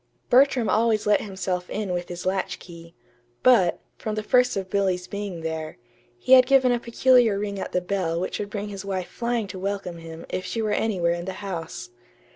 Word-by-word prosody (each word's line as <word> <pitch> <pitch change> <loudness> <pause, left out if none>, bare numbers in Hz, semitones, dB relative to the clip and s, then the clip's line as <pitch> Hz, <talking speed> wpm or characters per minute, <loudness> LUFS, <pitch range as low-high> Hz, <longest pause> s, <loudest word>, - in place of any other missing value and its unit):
Bertram 255 -2 +5
always 220 +2 +2
let 210 0 +3
himself 185 -2 -3
in 205 -3 -3
with 175 0 -3
his 175 0 -6
latchkey; 170 -3 -4 0.5
but, 215 -9 +4 0.2
from 215 -1 -3
the 215 - -3
first 250 0 +3
of 190 -1 -3
Billy's 190 -2 0
being 200 -4 -5
there, 160 -1 -4 0.4
he 255 - -5
had 255 -1 +8
given 265 -2 +5
a 240 - +1
peculiar 240 -2 +3
ring 200 -1 -3
at - - -5
the 180 - 0
bell 180 -3 -1
which 185 - -3
would 205 - -4
bring 205 0 -4
his 200 -1 -7
wife 190 -2 -3
flying 235 -2 -2
to 190 -1 -8
welcome 195 -3 -4
him 165 0 -9
if 185 - -3
she 230 - -4
were 215 -1 0
anywhere 185 -6 +1
in 170 0 -5
the 190 - -4
house. 165 -10 -6
195 Hz, 200 wpm, -25 LUFS, 180-220 Hz, 0.5 s, had